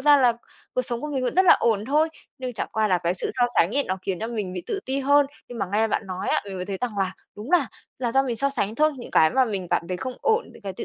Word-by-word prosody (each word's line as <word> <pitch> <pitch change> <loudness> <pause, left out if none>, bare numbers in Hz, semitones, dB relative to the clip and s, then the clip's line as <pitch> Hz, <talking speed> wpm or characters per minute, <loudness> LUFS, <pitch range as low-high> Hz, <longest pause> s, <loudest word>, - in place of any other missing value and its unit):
ra 290 +1 +6
là 250 -3 +5 0.4
cuộc 255 - +1
sống 240 -1 -3
của 300 - -4
mình 260 -2 -1
vẫn 245 - -1
rất 375 - +5
là - - +9
ổn 215 -3 +2
thôi, 305 +5 +2 0.3
nhưng 255 -1 -4
chẳng - - -4
qua 220 -1 +1
là 180 -2 +3
cái 170 +1 0
sự 185 - -3
so 245 - +5
sánh 190 +10 +3
ấy 285 - +2
nó 185 - -2
khiến 185 -3 -2
cho 225 - -2
mình 210 -6 -3
bị 180 -2 -5
tự 395 - -2
ti 270 +1 -1
hơn. 285 +1 +4 0.2
Nhưng 240 -1 -8
mà 195 - -1
nghe 220 +2 +2
bạn 205 - -1
nói 185 0 -4
á, - - +2
mình 195 -2 -7
mới 180 - -3
thấy 195 -2 -4
rằng 230 -5 -3
là 190 -1 0 0.2
đúng 215 +7 -7
là 345 -8 +4 0.3
là 240 -3 -1
do 270 - +4
mình 245 -4 -2
so 275 +4 +1
sánh 220 -6 -1
thôi, 305 +2 +3
những 240 - -9
cái 160 - +5
mà 260 0 +3
mình 195 -6 -3
cảm 170 - 0
thấy 180 - -2
không 255 +7 -5
ổn, 450 +1 +1
những - - -16
cái 195 -1 -4
tự - - -6
235 Hz, 320 wpm, -24 LUFS, 195-270 Hz, 0.4 s, là